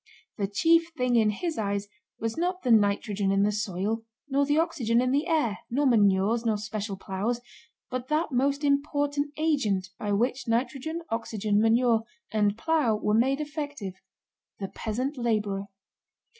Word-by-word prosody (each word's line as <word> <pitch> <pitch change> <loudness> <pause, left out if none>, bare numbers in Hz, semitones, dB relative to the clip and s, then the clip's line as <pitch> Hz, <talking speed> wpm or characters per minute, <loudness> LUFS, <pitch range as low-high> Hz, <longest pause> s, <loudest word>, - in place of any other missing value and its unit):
The 200 - +1
chief 330 +11 +3
thing 250 -1 +1
in 220 -2 +4
his 320 - -3
eyes 200 -1 -1 0.3
was 225 0 -2
not 360 +2 -1
the 250 - +2
nitrogen 205 -2 +2
in 195 0 +3
the 210 - +3
soil, 210 +2 -2 0.2
nor 280 0 +1
the 295 +1 +2
oxygen 255 -9 +1
in 255 +1 +1
the 290 +5 +1
air, 295 - +1
nor 280 +5 +1
manures, 210 -1 +3
nor 220 -2 +1
special 210 -1 -4
plows, 195 +6 -2 0.5
but 255 0 -3
that 305 +2 0
most 275 +3 +1
important 285 0 +1
agent 230 - +1
by 205 - -2
which 245 +6 0
nitrogen, 270 +8 -1
oxygen, 215 -2 0
manure, 230 0 +4 0.3
and 210 -1 +1
plow 300 -4 +2
were 210 0 0
made 265 +5 +3
effective—the 285 - -7
peasant 255 +6 -3
laborer. 210 -4 -1
230 Hz, 150 wpm, -27 LUFS, 210-285 Hz, 0.5 s, in